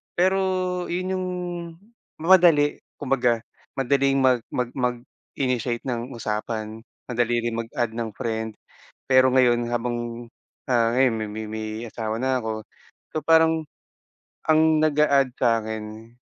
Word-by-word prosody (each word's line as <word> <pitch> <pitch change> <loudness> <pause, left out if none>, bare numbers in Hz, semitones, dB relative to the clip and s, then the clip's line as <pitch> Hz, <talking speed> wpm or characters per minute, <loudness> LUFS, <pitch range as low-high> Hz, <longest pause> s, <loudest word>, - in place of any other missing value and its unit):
pero 190 +2 +3 0.5
yun 185 +2 -2
yung 185 0 -2 0.9
madali, 165 -4 +5 0.2
kumbaga 125 -3 +1 0.4
madaling 135 +1 +2
mag 130 -2 +4
mag 125 -1 -1
mag-initiate 125 -1 -3
ng 120 +1 -3
usapan. 110 0 -4 0.3
Madali 120 -1 +1
rin 115 - -2
mag-add 115 -1 -3
ng 115 -2 -3
friend, 110 -1 -3 0.5
pero 130 0 +6
ngayon 120 -2 +4
habang, 120 0 -3 0.4
ah, 115 -1 +3
ngayon 130 -1 +4
may 110 -1 -3
may 110 +1 -6
may 110 0 -5 0.2
asawa 110 -1 -3
na 130 0 +1
ako 110 -2 -4 0.5
so - - +2
parang 160 0 +4 0.8
ang 160 0 +4
nag-a-add 145 -3 +3
sa'kin 110 -1 -2
120 Hz, 120 wpm, -24 LUFS, 115-140 Hz, 0.9 s, pero